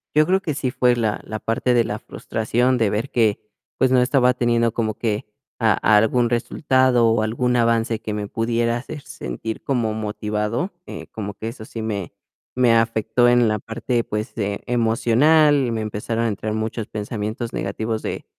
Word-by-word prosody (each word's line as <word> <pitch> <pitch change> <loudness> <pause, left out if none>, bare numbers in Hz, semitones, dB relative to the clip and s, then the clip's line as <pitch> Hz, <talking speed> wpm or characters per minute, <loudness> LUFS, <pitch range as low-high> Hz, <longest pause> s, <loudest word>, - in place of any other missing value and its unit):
Yo 155 0 +5
creo 190 +3 +2
que 155 -6 -3
sí 130 -2 -1
fue 125 -1 +3
la 110 -3 -1
la 110 - -5
parte 115 +3 0
de 120 - +4
la - - -4
frustración 120 +3 -1
de 110 -3 +3
ver 110 +7 -2
que, 110 -4 +2 0.4
pues, 130 0 +3
no 130 -1 +5
estaba 125 0 +3
teniendo 120 -2 +1
como 110 -3 -1
que 110 -3 -2 0.4
a - - +4 0.2
algún 120 +3 +3
resultado 130 0 +2
o 115 -1 +2
algún 125 +3 0
avance 115 -1 +1
que 105 - -5
me 105 -1 -3
pudiera 115 +2 0
hacer 145 +5 -7
sentir 110 - -6
como 120 -5 0
motivado, 105 - -2 0.2
eh, - - -8
como 105 -2 -5
que 110 +3 -5
eso 115 - -9
sí 115 - -7
me 100 -5 -4 0.4
me 125 -2 +4
afectó 115 +1 +2
en 120 -1 +4
la 110 -1 0
parte, 115 +2 -2
pues, 105 0 -4
eh, 100 -2 -2
emocional. 125 +4 +3
Me 115 - -2
empezaron 110 +2 -2
a - - +2
entrar 110 +1 -3
muchos 110 0 -3
pensamientos 110 +2 -4
negativos 110 +3 -3
de - - -5
115 Hz, 180 wpm, -22 LUFS, 110-125 Hz, 0.4 s, Yo